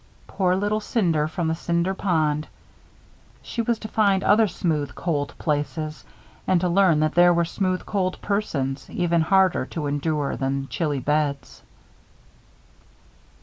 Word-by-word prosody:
Poor 185 -2 0
little 205 +2 0
Cinder 170 -9 0
from 165 +1 -3
the 160 - +1
Cinder 170 +3 -1
Pond! 155 -6 0 1.0
She 235 - -3
was 230 0 0
to 215 - -7
find 200 -3 +2
other 215 +1 +4
smooth, 150 -7 -2
cold 150 -5 -2
places; 155 -1 -3 0.4
and 185 - +3
to 180 - +1
learn 175 -3 +4
that 155 0 +1
there 175 0 +6
were 170 0 +2
smooth, 185 +1 -2
cold 185 -3 -1
persons 140 -10 -2
even 170 -2 +1
harder 190 +2 +3
to 155 -3 -5
endure 145 0 -1
than 135 0 -2
chilly 150 -5 -1
beds. 145 0 -1
170 Hz, 140 wpm, -24 LUFS, 150-190 Hz, 1.0 s, there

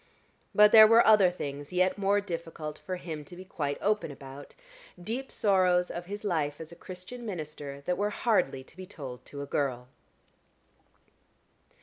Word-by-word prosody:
But 210 0 +7
there 220 -1 +10
were 230 +1 +6
other 210 -4 +6
things 145 -4 -6
yet 185 +1 +2
more 200 0 +2
difficult 165 -4 -6
for 185 - -5
him 160 -4 -6
to 175 - -12
be 185 +1 -10
quite 145 -6 -3
open 210 -3 +1
about 140 0 -11 0.4
deep 235 +9 -4
sorrows 185 -3 +2
of 175 0 -6
his 205 +2 -6
life 155 -7 -1
as 160 0 -9
a - - -11
Christian 185 +8 -9
minister 150 -8 -6
that 180 +5 -2
were 205 +1 +1
hardly 205 - 0
to 135 - -18
be 185 0 -9
told 135 -10 -9
to 140 -1 -7
a - - -5
girl. 130 -3 -2
180 Hz, 165 wpm, -29 LUFS, 145-205 Hz, 0.4 s, there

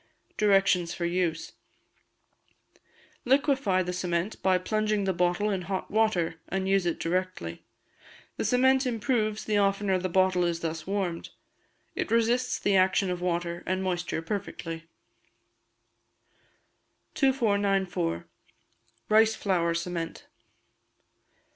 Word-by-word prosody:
Directions 195 -4 +3
for 175 - -2
Use. 170 -2 -1 1.7
Liquefy 265 -8 +2
the 180 0 -4
cement 180 +2 -2
by 185 -1 +3
plunging 215 +2 0
the 190 -1 0
bottle 180 +4 +1
in 190 -2 -1
hot 190 +1 -4
water, 180 -7 +1
and 190 0 -1
use 195 -2 +2
it 170 - -1
directly. 170 - -2 0.8
The - - -2
cement 260 +1 +3
improves 220 -2 -1
the 210 -1 +1
oftener 195 -1 +1
the 185 +1 -2
bottle 185 0 +3
is 170 -1 -1
thus 160 0 -4
warmed; 190 -4 -2 0.6
it - - -3
resists 235 +3 +2
the 200 - +1
action 190 0 +3
of 180 -1 -4
water 175 -1 -2
and 185 +1 0
moisture 175 -3 -2
perfectly. 165 -3 -5 2.3
2494. 200 - +1 0.8
Rice 220 +1 +4
Flour 170 -5 0
Cement. 170 -1 -4
190 Hz, 110 wpm, -28 LUFS, 175-210 Hz, 2.3 s, Rice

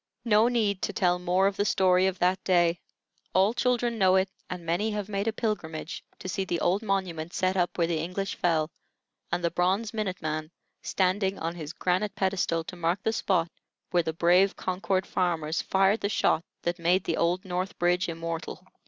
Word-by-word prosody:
No 220 0 +5
need 215 -6 +1
to 205 - -2
tell 180 -1 +2
more 180 +2 +2
of 195 0 +1
the - - +2
story 185 -2 +3
of 190 -1 -2
that 185 +1 +1
day; 175 -2 +3 0.6
all 195 +4 +4
children 240 -1 0
know 190 -1 +5
it, 190 0 +2 0.2
and 180 -2 -6
many 175 +7 0
have 210 -2 -3
made 200 +1 -2
a - - +3
pilgrimage 180 -9 -4
to - - -8
see 195 +1 -1
the 175 -2 -2
old 190 +4 +1
monument 180 -5 -2
set 185 0 +1
up 180 -2 0
where 170 - +3
the 165 -1 -1
English 185 +4 -3
fell, 160 -2 0 0.6
and 175 +1 -1
the 170 - +1
bronze 190 +6 0
Minute 205 -4 -2
Man, 155 0 -3 0.3
standing 190 +1 0
on 165 +1 -3
his 155 -3 -6
granite 185 +4 -1
pedestal 185 -4 0
to 180 - -8
mark 170 +2 -1
the 220 - +1
spot 175 -6 +1 0.4
where 175 - +4
the 160 - -2
brave 175 +4 +3
Concord 185 0 -1
farmers 165 -3 0
fired 195 +3 +2
the 200 - 0
shot 170 -5 +2 0.2
that 175 +1 -1
made 175 +3 +2
the - - -1
old 175 +3 +1
North 185 +1 -3
Bridge 175 +2 +1
immortal. 165 0 -5
185 Hz, 195 wpm, -27 LUFS, 170-195 Hz, 0.6 s, No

